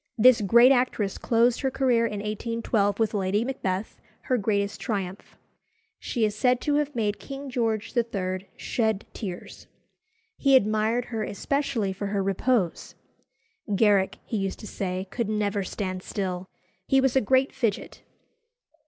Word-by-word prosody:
This 240 Hz, 0 st, +6 dB
great 235 Hz, +6 st, +6 dB
actress 245 Hz, -6 st, +1 dB
closed 235 Hz, +1 st, +2 dB
her 270 Hz, -, +1 dB
career 250 Hz, -3 st, +2 dB
in 205 Hz, -2 st, -4 dB
1812 215 Hz, -1 st, -1 dB
with 225 Hz, -1 st, +1 dB
Lady 200 Hz, +2 st, 0 dB
Macbeth, 200 Hz, -6 st, -3 dB, 0.2 s
her 255 Hz, -, 0 dB
greatest 200 Hz, -1 st, -1 dB
triumph. 195 Hz, -5 st, -4 dB, 0.6 s
She 235 Hz, -4 st, 0 dB
is 210 Hz, -, -1 dB
said 250 Hz, +3 st, +2 dB
to 295 Hz, -, 0 dB
have 295 Hz, -1 st, -1 dB
made 210 Hz, -3 st, -1 dB
King 275 Hz, 0 st, -7 dB
George 225 Hz, -2 st, -1 dB
III. 195 Hz, -5 st, -2 dB
shed 220 Hz, -3 st, -1 dB
tears. 185 Hz, -6 st, -7 dB, 0.7 s
He 275 Hz, -1 st, +4 dB
admired 220 Hz, +1 st, +2 dB
her 220 Hz, -, -1 dB
especially 225 Hz, -2 st, -1 dB
for 200 Hz, +2 st, -4 dB
her 200 Hz, -1 st, -1 dB
repose. 195 Hz, -1 st, 0 dB, 0.8 s
"Garrick," 200 Hz, -2 st, +3 dB
he 225 Hz, -, -3 dB
used 195 Hz, -1 st, -2 dB
to 215 Hz, -, -8 dB
say, 185 Hz, -1 st, -3 dB
"could 235 Hz, -4 st, -2 dB
never 205 Hz, -1 st, 0 dB
stand 185 Hz, -1 st, -4 dB
still. 185 Hz, -2 st, -4 dB, 0.4 s
He 270 Hz, -, +4 dB
was 265 Hz, -1 st, +2 dB
a 265 Hz, -, +5 dB
great 260 Hz, +5 st, +2 dB
fidget." 230 Hz, -6 st, -2 dB
215 Hz, 145 wpm, -26 LUFS, 200-245 Hz, 0.8 s, This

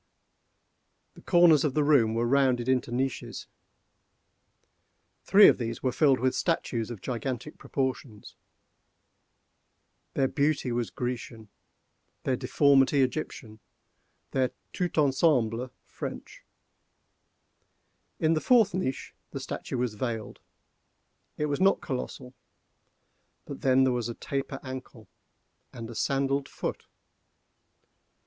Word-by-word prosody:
The -, -, -15 dB
corners 170 Hz, -5 st, +5 dB
of 145 Hz, -4 st, -1 dB
the 150 Hz, -, +3 dB
room 125 Hz, -7 st, +3 dB
were 115 Hz, +1 st, +1 dB
rounded 130 Hz, -1 st, +2 dB
into 130 Hz, -2 st, +1 dB
niches. 130 Hz, +1 st, -3 dB, 1.8 s
Three 205 Hz, +1 st, +7 dB
of -, -, +4 dB
these 115 Hz, -1 st, -4 dB
were 130 Hz, -, +1 dB
filled 135 Hz, 0 st, +3 dB
with 130 Hz, +1 st, +1 dB
statues 120 Hz, -9 st, -1 dB
of 115 Hz, -5 st, -7 dB
gigantic 130 Hz, +3 st, -4 dB
proportions. 130 Hz, -5 st, -4 dB, 1.8 s
Their 135 Hz, -, +2 dB
beauty 140 Hz, -2 st, 0 dB
was 120 Hz, -1 st, -1 dB
Grecian, 120 Hz, -3 st, -5 dB, 0.7 s
their 130 Hz, -, +1 dB
deformity 140 Hz, +1 st, +3 dB
Egyptian, 125 Hz, -5 st, -4 dB, 0.7 s
their 130 Hz, -1 st, +1 dB, 0.2 s
tout 180 Hz, -3 st, -2 dB
ensemble 130 Hz, -5 st, +2 dB, 0.2 s
French. -, -, -8 dB, 1.8 s
In 160 Hz, 0 st, +3 dB
the 155 Hz, -, 0 dB
fourth 230 Hz, -6 st, +4 dB
niche 170 Hz, -8 st, -3 dB, 0.2 s
the -, -, -6 dB
statue -, -, -5 dB
was 120 Hz, -2 st, -1 dB
veiled; 110 Hz, -1 st, -4 dB, 1.0 s
it 150 Hz, -, 0 dB
was 145 Hz, +3 st, -2 dB
not 195 Hz, +1 st, +4 dB
colossal. 125 Hz, 0 st, -6 dB, 1.1 s
But -, -, -8 dB
then 130 Hz, 0 st, +4 dB
there 130 Hz, -1 st, +2 dB
was 120 Hz, -1 st, -2 dB
a 120 Hz, -, -5 dB
taper 135 Hz, -1 st, -4 dB
ankle, 130 Hz, -4 st, -9 dB, 0.7 s
a 115 Hz, -1 st, -7 dB
sandalled 135 Hz, +3 st, 0 dB
foot. -, -, -5 dB
130 Hz, 110 wpm, -28 LUFS, 120-145 Hz, 1.8 s, Three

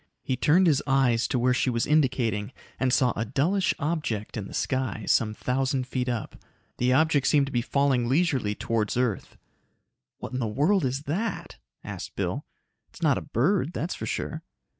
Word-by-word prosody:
He 130 Hz, -, -1 dB
turned 160 Hz, +8 st, +4 dB
his 150 Hz, -5 st, +3 dB
eyes 130 Hz, -4 st, +3 dB
to -, -, -1 dB
where 125 Hz, +1 st, +3 dB
she 130 Hz, -, +1 dB
was 115 Hz, -2 st, 0 dB
indicating 130 Hz, -7 st, +1 dB, 0.3 s
and 130 Hz, -1 st, +1 dB
saw 125 Hz, -2 st, +3 dB
a 110 Hz, -, -1 dB
dullish 155 Hz, -, +1 dB
object 150 Hz, -, -2 dB
in 105 Hz, -3 st, -4 dB
the -, -, -11 dB
sky, 130 Hz, -5 st, -2 dB
some 110 Hz, -1 st, +2 dB
thousand 130 Hz, +2 st, -1 dB
feet 125 Hz, 0 st, -2 dB
up. 120 Hz, -3 st, -5 dB, 0.4 s
The 125 Hz, +1 st, +2 dB
object 145 Hz, 0 st, +3 dB
seemed 145 Hz, -1 st, +4 dB
to 140 Hz, -, -7 dB
be 120 Hz, -, +1 dB
falling 135 Hz, -2 st, +1 dB
leisurely 135 Hz, -8 st, +1 dB
towards 115 Hz, 0 st, -1 dB
earth. 125 Hz, -5 st, -1 dB, 0.8 s
"What -, -, -8 dB
in 130 Hz, -, -2 dB
the 115 Hz, -, -1 dB
world 145 Hz, -, +2 dB
is 135 Hz, +2 st, -2 dB
that?" 185 Hz, +10 st, -3 dB, 0.3 s
asked -, -, -7 dB
Bill. -, -, -3 dB, 0.4 s
"It's -, -, -12 dB
not 145 Hz, -5 st, +3 dB
a -, -, -9 dB
bird, 165 Hz, -, 0 dB
that's 170 Hz, +3 st, -2 dB
for -, -, -6 dB
sure." -, -, -3 dB
130 Hz, 180 wpm, -26 LUFS, 120-150 Hz, 0.8 s, turned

